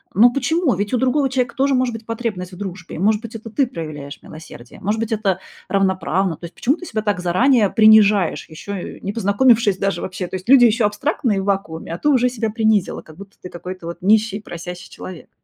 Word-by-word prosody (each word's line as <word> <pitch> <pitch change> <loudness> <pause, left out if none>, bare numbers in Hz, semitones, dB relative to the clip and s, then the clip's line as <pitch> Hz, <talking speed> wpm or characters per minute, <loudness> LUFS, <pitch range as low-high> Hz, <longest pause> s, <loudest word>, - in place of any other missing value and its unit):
Но 240 +4 +6
почему? 295 +1 +1
Ведь 205 +2 -2
у - - +3
другого 260 +2 +1
человека 250 -2 -1
тоже 270 0 +2
может 255 -2 +1
быть 225 0 -8
потребность 215 -6 -4
в - - -10
дружбе. 185 -4 -7
Может 210 +5 +2
быть, 230 0 -9
это 225 0 -8
ты 270 +1 +1
проявляешь 155 - -7
милосердие, 155 -6 -12
может 210 +3 -1
быть, 225 0 -3
это 200 -4 0 0.3
равноправно. 190 -3 0
То 170 - -9
есть 170 - -11
почему 270 +5 +1
ты 355 - -10
себя 215 -2 -3
так 205 -3 0
заранее 205 +5 +3
принижаешь, 215 -4 +4
ещё, 180 +6 -8
э, 185 - -7
не 200 - -4
познакомившись 215 -1 +3
даже 195 0 -1
вообще? 185 0 -4
То 185 - -4
есть, 185 +6 -12
люди 260 -3 +8
ещё 225 -1 +3
абстрактные 230 -1 -1
в 190 - -5
вакууме, 180 -5 -2
а 170 - -5
ты 295 - +1
уже 250 -3 +3
себя 225 -3 -2
принизила, 220 -3 0
как 155 - -15
будто 200 0 -13
ты 180 - -9
какой-то 180 0 -8
вот 170 +1 -7
нищий, 215 +1 +2
просящий 180 -2 -8
человек. 185 -3 -10
205 Hz, 220 wpm, -20 LUFS, 185-235 Hz, 0.3 s, люди